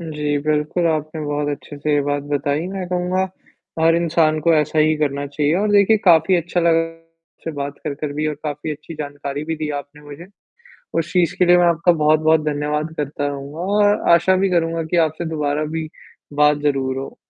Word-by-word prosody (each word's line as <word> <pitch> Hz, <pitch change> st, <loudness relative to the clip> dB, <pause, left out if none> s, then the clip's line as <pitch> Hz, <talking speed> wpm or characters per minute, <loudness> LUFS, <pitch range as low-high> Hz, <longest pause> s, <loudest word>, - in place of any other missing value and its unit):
जी, 150 Hz, -3 st, -2 dB
बिल्कुल 155 Hz, +3 st, 0 dB
आपने 155 Hz, 0 st, -3 dB
बहुत 145 Hz, 0 st, -2 dB
अच्छे 145 Hz, 0 st, -6 dB
से 150 Hz, +1 st, -1 dB
ये 145 Hz, -, +3 dB
बात 145 Hz, 0 st, -1 dB
बताई, 145 Hz, +3 st, -1 dB
मैं 190 Hz, -1 st, -5 dB
कहूँगा 180 Hz, +1 st, 0 dB, 0.6 s
हर 165 Hz, +1 st, +4 dB
इंसान 165 Hz, -2 st, +2 dB
को 170 Hz, +2 st, +3 dB
ऐसा 150 Hz, 0 st, +1 dB
ही 155 Hz, +1 st, +4 dB
करना 145 Hz, -1 st, -1 dB
चाहिए 145 Hz, +2 st, 0 dB
और 210 Hz, +2 st, 0 dB
देखिए 205 Hz, +2 st, +5 dB
काफ़ी 175 Hz, 0 st, +5 dB
अच्छा 175 Hz, +1 st, -1 dB
लगा 165 Hz, -1 st, +3 dB
आपसे 165 Hz, 0 st, -11 dB
बात 140 Hz, 0 st, -4 dB
कर, 150 Hz, -, -2 dB
कर 145 Hz, 0 st, -5 dB
भी 150 Hz, +1 st, -2 dB
और 155 Hz, -, -1 dB
काफ़ी 150 Hz, +1 st, -4 dB
अच्छी 155 Hz, +2 st, -10 dB
जानकारी 145 Hz, -1 st, -5 dB
भी 160 Hz, +1 st, -3 dB
दी 155 Hz, 0 st, -4 dB
आपने 145 Hz, +1 st, -17 dB
मुझे। 145 Hz, +4 st, -11 dB, 0.7 s
उस 165 Hz, +1 st, -2 dB
चीज़ 180 Hz, -4 st, +2 dB
के 180 Hz, -, +5 dB
लिए 175 Hz, 0 st, +6 dB
मैं 175 Hz, -, +4 dB
आपका 170 Hz, +1 st, +3 dB
बहुत-बहुत 155 Hz, 0 st, +3 dB
धन्यवाद 150 Hz, +1 st, -2 dB
करता 145 Hz, 0 st, -3 dB
रहूँगा 140 Hz, +1 st, -6 dB, 0.2 s
और 205 Hz, 0 st, +2 dB
आशा 185 Hz, +2 st, +4 dB
भी 190 Hz, +1 st, +1 dB
करूँगा 165 Hz, -1 st, 0 dB
की -, -, +3 dB
आपसे 155 Hz, +3 st, -6 dB
दोबारा 150 Hz, -1 st, -1 dB
भी 160 Hz, -1 st, -3 dB, 0.4 s
बात 150 Hz, 0 st, +3 dB
ज़रूर 135 Hz, -3 st, 0 dB
हो। 135 Hz, -, -7 dB
155 Hz, 200 wpm, -20 LUFS, 145-170 Hz, 0.7 s, लिए